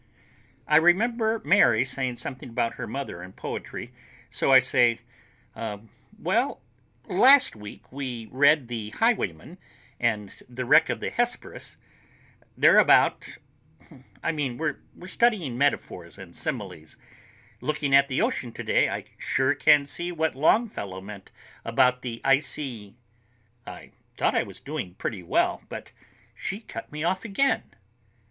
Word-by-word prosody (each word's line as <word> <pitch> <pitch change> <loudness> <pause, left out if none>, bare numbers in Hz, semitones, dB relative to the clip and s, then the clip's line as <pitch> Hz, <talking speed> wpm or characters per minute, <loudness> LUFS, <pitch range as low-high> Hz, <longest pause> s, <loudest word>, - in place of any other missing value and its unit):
I 150 - +5
remember 220 +6 +2
Mary 140 - +4
saying 130 -1 -3
something 130 +1 -7
about 115 0 -1
her 120 - -6
mother 130 -7 -6
and 90 +1 -11
poetry, - - -7 0.4
so - - +1
I 135 - +10
say, 120 -2 +3 0.5
"Well, 110 -1 -4 0.5
uh—last 260 - +5
week 105 -1 -11
we 125 -4 -5
read 140 0 +4
'The 115 -3 -5
Highwayman' 175 - -1 0.4
and 105 -4 -2
'The 125 +1 -5
Wreck 150 +6 +5
of - - -3
the - - -3
Hesperus.' 240 0 -3 0.8
They're - - +6
about—I - - -1
mean, 140 -6 -3
we 155 -1 0 0.2
were 180 - -12
studying 195 - +1
metaphors 110 -11 -1
and 95 -4 -12
similes. - - -6 0.6
Looking 145 -2 -1
at 140 0 +6
the 130 -1 0
ocean 120 - -2
today, - - +1
I - - -4
sure 130 +2 +1
can 150 0 +4
see 175 +5 -4
what 160 -2 -1
Longfellow 135 - 0
meant 100 0 -11 0.3
about 125 0 +2
the 115 -2 -6
icy...." 135 -6 0 0.7
I - - -10 0.3
thought - - +1
I - - +2
was - - -9
doing 130 - -6
pretty 100 -1 -4
well, 85 - 0
but - - -8 0.4
she 195 - -5
cut 115 - -9
me 150 0 -5
off 185 +2 0
again. 230 +6 0
135 Hz, 135 wpm, -26 LUFS, 115-160 Hz, 0.8 s, I